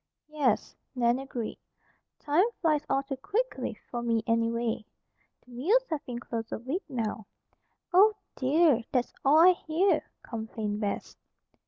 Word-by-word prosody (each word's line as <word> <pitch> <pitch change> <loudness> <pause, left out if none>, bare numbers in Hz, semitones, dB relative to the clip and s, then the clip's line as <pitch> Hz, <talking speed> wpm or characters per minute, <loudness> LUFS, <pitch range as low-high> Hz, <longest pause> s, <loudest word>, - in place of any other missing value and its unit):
"Yes," 280 -7 0 0.2
Nan 240 0 +2
agreed. 250 -4 -5 0.6
"Time 320 +9 +2
flies 305 -4 +2
all 275 - +2
too 275 -1 -5
quickly, 440 - -2 0.2
for 240 - -2
me, 230 -2 +1
anyway. 230 0 0 0.6
The 250 - -18
mills 380 - +2
have 310 -3 -2
been 245 -1 -4
closed 230 -1 -5
a - - -2
week 265 - -3
now." 220 -5 -3 0.7
"Oh, 410 +4 +7 0.2
dear! 280 -2 +3
That's 250 -2 0
all 280 +3 +5
I 345 +3 +8
hear," 355 +2 +1 0.2
complained 220 -2 -4
Bess. 205 -1 -3
255 Hz, 140 wpm, -29 LUFS, 230-315 Hz, 0.7 s, I